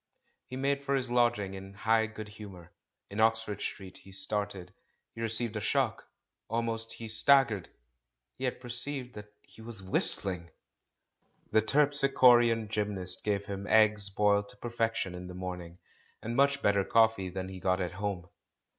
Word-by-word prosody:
He 130 Hz, -, -7 dB
made 140 Hz, +1 st, 0 dB
for 140 Hz, 0 st, 0 dB
his 130 Hz, -2 st, -2 dB
lodging 120 Hz, -5 st, +1 dB
in 95 Hz, +1 st, -9 dB
high 110 Hz, +1 st, +2 dB
good 110 Hz, -1 st, -8 dB
humour. 100 Hz, -5 st, -12 dB, 0.4 s
In 100 Hz, -, -5 dB
Oxford 110 Hz, -1 st, +1 dB
Street 95 Hz, -3 st, -6 dB
he 95 Hz, -, -16 dB
started, 95 Hz, -2 st, -2 dB, 0.4 s
he 115 Hz, -, -8 dB
received 115 Hz, 0 st, 0 dB
a -, -, -1 dB
shock, -, -, 0 dB, 0.4 s
almost 115 Hz, 0 st, -2 dB
he 115 Hz, -, -8 dB
staggered 115 Hz, -, +3 dB, 0.4 s
— -, -, -53 dB
^he 130 Hz, -, -2 dB
had 125 Hz, -, -2 dB
perceived 125 Hz, +1 st, -5 dB
that 105 Hz, 0 st, -11 dB
he -, -, -17 dB
was 110 Hz, -4 st, -6 dB
whistling! 95 Hz, -2 st, 0 dB, 1.0 s
The 110 Hz, -, +4 dB
terpsichorean 125 Hz, -3 st, +4 dB
gj^mnast 100 Hz, -4 st, +1 dB
gave 100 Hz, -1 st, -1 dB
him 100 Hz, 0 st, -6 dB
eggs 105 Hz, -2 st, +4 dB
boiled 100 Hz, 0 st, +1 dB
to -, -, -10 dB
perfection 115 Hz, -5 st, -2 dB
in 90 Hz, 0 st, -8 dB
the 90 Hz, -, -9 dB
morning, 90 Hz, -2 st, -7 dB, 0.5 s
and 115 Hz, +2 st, -4 dB
much 140 Hz, +1 st, +2 dB
better 100 Hz, -1 st, +3 dB
coffee 110 Hz, -3 st, +2 dB
than 95 Hz, +1 st, -5 dB
he 95 Hz, -1 st, -8 dB
got 95 Hz, +1 st, 0 dB
at 90 Hz, -1 st, -2 dB
home. 95 Hz, -2 st, -4 dB
105 Hz, 160 wpm, -30 LUFS, 95-115 Hz, 1.0 s, The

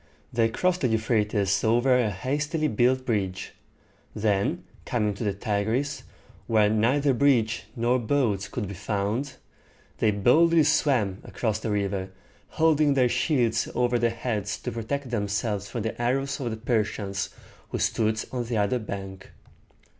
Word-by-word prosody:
They 115 Hz, -1 st, +2 dB
crossed 180 Hz, +9 st, 0 dB
the 130 Hz, -, +3 dB
Eu 110 Hz, -1 st, +2 dB
phra´tes 105 Hz, -3 st, +1 dB
over 120 Hz, +3 st, +3 dB
a 120 Hz, -4 st, +2 dB
hastily 145 Hz, -, -1 dB
built 130 Hz, +2 st, +2 dB
bridge; 95 Hz, -5 st, -2 dB, 0.6 s
then 105 Hz, -2 st, 0 dB, 0.2 s
coming 105 Hz, -4 st, 0 dB
to 100 Hz, -, -6 dB
the 105 Hz, -, +1 dB
Tigris, 110 Hz, +6 st, -1 dB, 0.5 s
where 105 Hz, -2 st, +3 dB
neither 130 Hz, +6 st, +2 dB
bridge 120 Hz, -5 st, +2 dB
nor 120 Hz, +2 st, +1 dB
boats 115 Hz, -5 st, 0 dB
could 110 Hz, -5 st, -4 dB
be 100 Hz, -, -6 dB
found, 105 Hz, +7 st, -2 dB, 0.6 s
they 110 Hz, -, +3 dB
boldly 155 Hz, -, +4 dB
swam 130 Hz, -10 st, +2 dB
across 110 Hz, -3 st, -2 dB
the 110 Hz, -, -4 dB
river, 100 Hz, -2 st, -1 dB, 0.5 s
holding 155 Hz, -3 st, +4 dB
their 125 Hz, -2 st, +3 dB
shields 120 Hz, -2 st, +1 dB
over 120 Hz, 0 st, +2 dB
their 120 Hz, 0 st, +2 dB
heads 115 Hz, -3 st, -3 dB
to 125 Hz, -, -4 dB
protect 125 Hz, +4 st, -4 dB
themselves 100 Hz, -2 st, -2 dB
from 115 Hz, -, -4 dB
the 115 Hz, +1 st, -4 dB
arrows 135 Hz, +4 st, 0 dB
of 125 Hz, -4 st, -2 dB
the 110 Hz, -, -4 dB
Persians 105 Hz, -4 st, -1 dB, 0.4 s
who -, -, -3 dB
stood 110 Hz, -1 st, 0 dB
on 125 Hz, -2 st, -2 dB
the 115 Hz, -1 st, -2 dB
other 105 Hz, +5 st, +1 dB
bank. 95 Hz, -3 st, -7 dB
115 Hz, 150 wpm, -26 LUFS, 105-130 Hz, 0.6 s, boldly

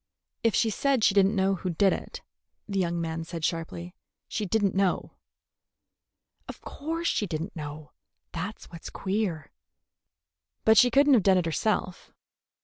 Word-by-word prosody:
"If 230 Hz, -2 st, +2 dB
she 225 Hz, -, +2 dB
said 270 Hz, +1 st, +1 dB
she 195 Hz, -, +5 dB
did 195 Hz, -1 st, +5 dB
n't 210 Hz, -, -1 dB
know 195 Hz, 0 st, +2 dB
who 185 Hz, 0 st, -3 dB
did 190 Hz, +3 st, +3 dB
it," -, -, -7 dB, 0.4 s
the 195 Hz, -2 st, -1 dB
young 170 Hz, -2 st, 0 dB
man 165 Hz, 0 st, -3 dB
said 165 Hz, -1 st, -4 dB
sharply, 170 Hz, +2 st, -4 dB, 0.3 s
"she 210 Hz, -2 st, -3 dB
did 215 Hz, +2 st, +1 dB
n't 195 Hz, -, +1 dB
know." 190 Hz, -2 st, 0 dB, 1.4 s
"Of -, -, -8 dB
course 330 Hz, +3 st, -4 dB
she 210 Hz, -, 0 dB
did 160 Hz, -2 st, -3 dB
n't 190 Hz, -, -9 dB
know. 150 Hz, -1 st, -7 dB, 0.4 s
That 180 Hz, +6 st, -4 dB
's -, -, -13 dB
what's 170 Hz, -1 st, -8 dB
queer." 190 Hz, -5 st, -2 dB, 1.1 s
"But 220 Hz, -1 st, +7 dB
she 250 Hz, -, +6 dB
could 280 Hz, +4 st, +4 dB
n't 285 Hz, -, +6 dB
have 240 Hz, -, +6 dB
done 190 Hz, 0 st, +4 dB
it 180 Hz, -, +1 dB
herself." 185 Hz, +2 st, -2 dB
190 Hz, 175 wpm, -27 LUFS, 170-220 Hz, 1.4 s, But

